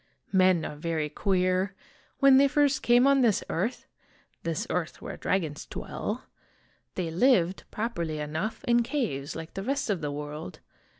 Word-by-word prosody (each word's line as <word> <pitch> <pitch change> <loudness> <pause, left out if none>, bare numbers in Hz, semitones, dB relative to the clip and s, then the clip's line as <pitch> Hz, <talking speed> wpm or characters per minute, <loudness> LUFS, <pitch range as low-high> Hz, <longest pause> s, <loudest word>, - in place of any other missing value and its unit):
Men 185 -3 +4
are 150 - -6
very 160 -1 -2
queer. 185 +3 +1 0.4
When 275 -1 +7
they 280 +1 +6
first 285 -1 +2
came 245 +1 +5
on 275 -1 +5
this 225 -6 +3
earth, 215 +9 -2 0.6
this 165 -2 -2
earth 175 -2 -2
where - - -6
dragons 160 -6 -2
dwell, - - -4 0.7
they 170 -3 -2
lived, 185 -2 +3
properly 170 -9 -3
enough, 155 +9 -3
in 240 0 +3
caves 230 - -2
like 165 0 -7
the 195 - -4
rest 270 +1 -1
of 185 -5 -1
the 145 -1 -2
world. 145 -7 -6
185 Hz, 155 wpm, -28 LUFS, 160-240 Hz, 0.7 s, When